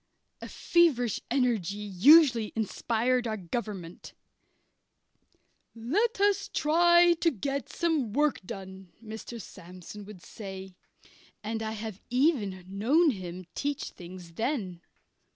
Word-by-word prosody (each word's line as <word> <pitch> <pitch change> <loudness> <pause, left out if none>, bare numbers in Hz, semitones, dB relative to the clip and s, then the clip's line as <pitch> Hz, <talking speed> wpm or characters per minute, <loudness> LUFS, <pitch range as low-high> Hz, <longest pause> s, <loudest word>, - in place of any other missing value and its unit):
A - - -7
feverish 280 - +2
energy 235 -7 0
usually 230 - +5
inspired 235 +3 0
our 215 -1 -2
government. 190 -2 -6 1.6
"Let 370 - 0
us 400 0 +2
try 345 +3 +5
to 335 - +4
get 275 - -4
some 315 -10 0
work 295 +5 +1
done," 190 -2 -9
Mr. 220 +2 -8
Sandsome 185 +1 -11
would 200 -4 -12
say 190 -3 -9 0.7
and 220 +1 -3
I 220 0 -3
have 215 -2 -7
even 240 - +1
known 265 - +3
him 185 -4 -7
teach 285 0 -3
things 175 -1 -11
then. 205 - -3
225 Hz, 110 wpm, -28 LUFS, 190-285 Hz, 1.6 s, usually